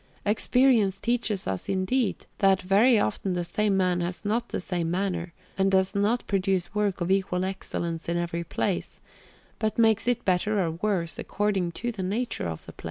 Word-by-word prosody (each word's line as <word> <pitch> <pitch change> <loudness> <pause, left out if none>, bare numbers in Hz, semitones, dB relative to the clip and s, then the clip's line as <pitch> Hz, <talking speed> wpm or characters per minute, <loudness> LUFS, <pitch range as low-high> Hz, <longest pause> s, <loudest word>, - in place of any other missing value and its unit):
Experience 220 -1 +3
teaches 230 -3 0
us, 95 -1 -3
indeed, 200 +6 0
that 195 -1 +4
very 210 +6 +5
often 185 - 0
the 175 -1 -1
same 200 +3 0
man 180 -2 +2
has 175 +4 -4
not 230 +3 0
the - - -2
same 175 -3 -2
manner 180 -1 -2 0.3
and 195 0 +4
does 190 0 +2
not 210 +4 +1
produce 190 -2 0
work 205 -3 0
of 175 +2 0
equal 185 -1 +1
excellence 170 -3 -4
in 170 - 0
every 170 0 -2
place, 180 +2 -2 0.6
but 215 -1 -1
makes 225 -1 +3
it 245 -2 +1
better 200 +3 +1
or 170 -4 +1
worse 170 -1 -2
according 195 -4 -1
to 240 +7 -3
the 215 -4 -6
nature 205 - -2
of 80 -1 -6
the - - -9
place. - - -37
195 Hz, 180 wpm, -26 LUFS, 175-210 Hz, 0.6 s, very